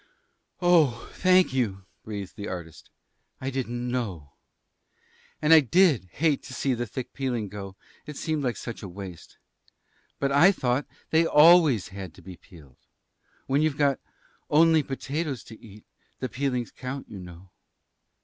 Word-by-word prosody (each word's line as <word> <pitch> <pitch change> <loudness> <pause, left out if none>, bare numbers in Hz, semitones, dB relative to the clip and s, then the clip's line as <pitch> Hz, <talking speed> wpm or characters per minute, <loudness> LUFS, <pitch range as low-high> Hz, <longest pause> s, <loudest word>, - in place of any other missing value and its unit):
"Oh, 155 -10 +3
thank 185 -5 +4
you," 100 -7 -1 0.2
breathed 100 -3 -7
the 105 - -6
artist. 85 -4 -8 0.5
"I 135 +1 -3
didn't 120 -2 -3
know. 100 - -4 1.1
And 150 +2 +6
I 160 - +10
did 150 - +3
hate 155 -3 +1
to 130 - -8
see 135 +1 0
the 120 0 -3
thick 130 +3 -6
peeling 120 -6 -2
go; 100 -1 -8 0.3
it 150 -2 -7
seemed 145 -7 -2
such 115 - -7
a 100 - -7
waste. 90 -2 -10 0.8
But 140 0 0
I 145 +8 +6
thought 130 -6 -1 0.2
they 165 +1 +4
always 150 - +6
had 95 -4 -8
to - - -16
be 95 -2 -10
peeled. 75 -8 -18 0.7
When 140 +2 +1
you've 155 -2 +1
got 140 -2 +2 0.5
only 160 +1 +5
potatoes 140 0 -4
to 110 - -14
eat, 105 -1 -14 0.3
the 130 - -4
peelings 125 -2 -2
count, 130 +2 -7
you 100 - -9
know." 90 +1 -12
125 Hz, 150 wpm, -26 LUFS, 100-150 Hz, 1.1 s, I